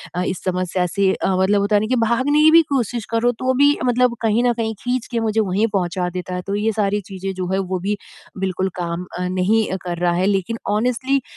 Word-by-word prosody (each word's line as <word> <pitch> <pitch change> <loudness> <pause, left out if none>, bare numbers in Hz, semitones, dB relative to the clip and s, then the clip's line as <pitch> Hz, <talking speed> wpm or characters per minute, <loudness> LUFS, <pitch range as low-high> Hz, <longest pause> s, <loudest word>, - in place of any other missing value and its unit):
अ, 180 - 0
इस 180 - -4
समस्या 180 0 -1
से 195 +2 +1
अ, - - -2
मतलब 200 +2 +3
होता 205 +1 +1
है 205 - +4
न 215 - -2
कि 255 - +1
भागने 260 +6 +2
की 315 - +8
भी 330 +1 +8
कोशिश 240 -4 -1
करो, 230 +2 +2
तो 255 +2 -1
भी 285 +3 +4
मतलब 250 0 +2
कहीं 225 +1 +2
न 245 - +3
कहीं 225 -1 -2
खींच 250 -1 -2
के 235 - 0
मुझे 220 -1 0
वहीं 205 +2 +1
पहुँचा 180 -1 -1
देता 180 0 -5
है। 180 - -3
तो 200 - -1
ये 215 +2 +1
सारी 205 -1 0
चीज़ें 195 -1 -6
जो 185 -1 -4
हैं, 190 - +1
वो 185 -1 -2
भी 205 +3 -2 0.4
बिल्कुल 190 0 -1
काम 175 +1 -3
अ, - - -2
नहीं 185 +5 +1 0.2
कर 175 -1 -4
रहा 175 0 +1
है। 180 +2 +1
लेकिन 200 +3 0
ऑनेस्टली 250 +6 +1
205 Hz, 240 wpm, -20 LUFS, 185-235 Hz, 0.4 s, की